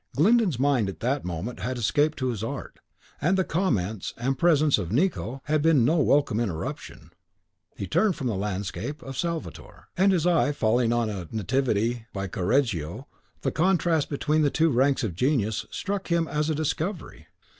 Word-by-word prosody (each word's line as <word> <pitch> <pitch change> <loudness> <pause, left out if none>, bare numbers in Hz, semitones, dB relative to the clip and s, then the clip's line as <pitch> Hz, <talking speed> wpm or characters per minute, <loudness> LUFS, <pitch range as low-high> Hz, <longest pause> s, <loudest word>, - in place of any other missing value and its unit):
Glyndon's 200 - +3
mind 130 -6 +2
at 95 - -8
that 135 +4 0
moment 90 +7 -5
had 125 +2 -3
escaped 145 +7 +1
to 130 -2 -1
his 110 -4 -3
art, 115 - -6 0.4
and 175 +6 +2
the 190 - +3
comments 110 - -1
and 130 +3 -1
presence 155 -3 +3
of 90 -3 -4
Nicot 135 - 0
had 150 +1 +1
been 150 -6 +4
no 160 +6 +3
welcome 140 -6 +2
interruption. 95 -9 -5 0.6
He - - -4
turned 185 - +2
from 135 - -5
the 120 - 0
landscape 100 +8 -4
of 135 0 -7
Salvator, 170 +3 -5
and 195 +2 +4
his 175 -3 +1
eye 165 -4 +3
falling 115 -1 +2
on 120 -2 +1
a 95 -5 -6
Nativity 115 0 0
by 100 -1 -3
Coreggio, 95 - -1 0.4
the - - -1
contrast 170 -3 +1
between 150 +2 +1
the 145 - +3
two 160 +2 +2
ranks 135 +2 +2
of 105 -6 -2
genius 110 - 0
struck 200 0 -4
him 170 -1 +1
as 150 +1 -1
a 155 - 0
discovery. 160 +4 -3
135 Hz, 175 wpm, -26 LUFS, 110-160 Hz, 0.6 s, been